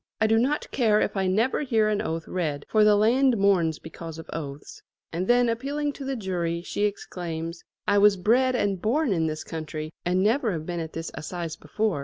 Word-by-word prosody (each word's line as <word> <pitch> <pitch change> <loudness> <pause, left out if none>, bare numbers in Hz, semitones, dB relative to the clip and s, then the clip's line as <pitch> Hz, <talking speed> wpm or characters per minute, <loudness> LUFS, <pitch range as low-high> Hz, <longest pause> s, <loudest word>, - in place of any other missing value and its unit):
"I 220 - +3
do 225 +1 +4
not 280 +5 0
care 220 -5 +3
if - - 0
I 190 -1 +1
never 220 +10 +1
hear 225 -6 +2
an 210 -1 +1
oath 165 0 -3
read, 155 -6 -2
for 215 -1 +4
the 210 0 +6
land 240 +4 +4
mourns 180 -6 +3
because 165 0 -9
of 160 - -9
oaths." 145 -3 -7 0.3
And 180 +3 -2
then 245 0 +4
appealing 285 +5 -1
to 280 - -8
the 270 0 -2
jury 175 -5 -2
she 205 - -1
exclaims: 170 -4 -4 0.2
"I 205 0 +4
was 205 -1 +6
bred 250 +7 +3
and 200 -6 0
born 260 +1 +1
in 165 -3 +1
this 155 0 -4
county 155 -1 -6
and 180 +2 +1
never 225 0 +2
have 155 -2 -4
been 175 0 -3
at 160 -1 -5
this 165 0 -5
assize 170 0 -5
before. 195 +3 -1
195 Hz, 210 wpm, -26 LUFS, 165-225 Hz, 0.3 s, the